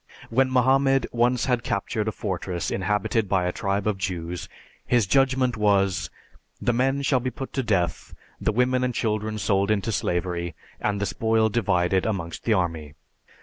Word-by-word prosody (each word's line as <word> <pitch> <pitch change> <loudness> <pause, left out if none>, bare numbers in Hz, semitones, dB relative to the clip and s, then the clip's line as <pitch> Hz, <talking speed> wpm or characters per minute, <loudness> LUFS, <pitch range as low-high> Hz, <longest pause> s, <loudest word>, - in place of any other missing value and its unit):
When 130 +3 +3
Mohammed 135 +1 +3
once 120 0 +2
had 125 -2 +1
captured 105 0 -2
a - - +1
fortress 90 -4 -3
inhabited 105 +2 0
by 95 -2 +2
a 90 - 0
tribe 100 +2 -2
of 105 -3 0
Jews, 90 -2 -4 0.3
his 120 -4 +2
judgment 130 +2 +2
was, 100 -3 +2 0.5
"The 120 - +1
men 135 +3 +1
shall 135 -2 +3
be 130 +1 -2
put 135 +2 -7
to 135 - 0
death, 95 -8 -1 0.2
the - - +1
women 125 +3 +2
and 125 -2 -1
children 110 -1 -1
sold 100 -1 +1
into 110 +1 +1
slavery, 85 -4 -2 0.2
and 100 -1 -1
the 100 - 0
spoil 110 +1 +1
divided 95 -4 +1
amongst 90 -6 -4
the 115 - +3
army." 80 -6 -2
105 Hz, 165 wpm, -25 LUFS, 95-125 Hz, 0.5 s, When